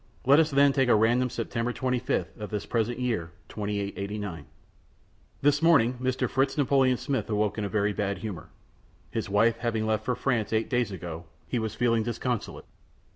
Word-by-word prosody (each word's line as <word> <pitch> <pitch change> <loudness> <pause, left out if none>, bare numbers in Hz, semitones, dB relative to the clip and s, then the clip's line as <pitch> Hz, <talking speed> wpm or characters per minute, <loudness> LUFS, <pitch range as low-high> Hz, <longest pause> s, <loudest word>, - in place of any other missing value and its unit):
Let 140 +4 +6
us 160 -1 +3
then 140 -1 +4
take 135 -2 +2
at 120 - +6
random 120 +4 +3
September 115 +1 -2
25th 125 +1 -1
of 105 - -5
this 105 -1 -3
present 115 0 -1
year 115 -10 -1 0.2
2889. 100 -2 -4 1.0
This 145 0 +3
morning 130 -7 +4
Mr. 130 0 0
Fritz 135 +2 0
Napoleon 135 -3 +3
Smith 135 -2 -2
awoke 105 0 0
in 100 -1 -2
very 105 0 +1
bad 100 -1 -2
humor. 105 -7 -7 0.6
His 110 -3 -3
wife 115 +3 +3
having 115 -2 -1
left 110 -1 0
for 125 -1 -1
France 115 -5 -1
eight 110 +4 0
days 120 -4 +1
ago, 85 -2 -7 0.2
he 125 - -2
was 110 -1 -3
feeling 115 -1 +2
disconsolate. 120 +1 -3
115 Hz, 170 wpm, -27 LUFS, 105-130 Hz, 1.0 s, Let